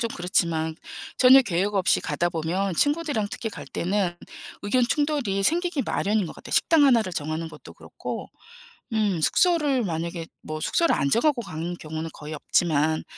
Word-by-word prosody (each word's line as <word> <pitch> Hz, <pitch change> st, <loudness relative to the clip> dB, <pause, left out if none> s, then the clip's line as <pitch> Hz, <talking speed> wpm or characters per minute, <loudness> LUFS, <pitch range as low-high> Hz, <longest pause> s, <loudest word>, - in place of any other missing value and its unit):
좀 230 Hz, -, 0 dB
그렇지만 165 Hz, -3 st, 0 dB, 0.4 s
전혀 260 Hz, +1 st, +8 dB
계획 200 Hz, -1 st, -1 dB
없이 190 Hz, -2 st, +2 dB
가다 175 Hz, -, -1 dB
보면 175 Hz, +3 st, -2 dB
친구들이랑 290 Hz, -, 0 dB
특히 225 Hz, -, -4 dB
갈 -, -, -9 dB
때는 180 Hz, -1 st, -1 dB, 0.5 s
의견 245 Hz, +5 st, +1 dB
충돌이 275 Hz, -7 st, 0 dB
생기기 340 Hz, -, +1 dB
마련인 210 Hz, -2 st, 0 dB
것 -, -, -9 dB
같아요, -, -, -10 dB
식당 320 Hz, -3 st, +4 dB
하나를 230 Hz, -9 st, +3 dB
정하는 155 Hz, +2 st, -3 dB
것도 -, -, -13 dB
그렇고 -, -, -7 dB, 0.6 s
음 210 Hz, -6 st, +1 dB
숙소를 295 Hz, -, +3 dB
만약에 170 Hz, -1 st, -4 dB, 0.2 s
뭐 155 Hz, 0 st, -6 dB
숙소를 335 Hz, -, +2 dB
안 140 Hz, -, 0 dB
정하고 265 Hz, -, +2 dB
가는 170 Hz, -2 st, -5 dB
경우는 160 Hz, +1 st, -6 dB
거의 150 Hz, +1 st, -8 dB
없지만 155 Hz, 0 st, +1 dB
195 Hz, 355 characters per minute, -25 LUFS, 165-255 Hz, 0.6 s, 전혀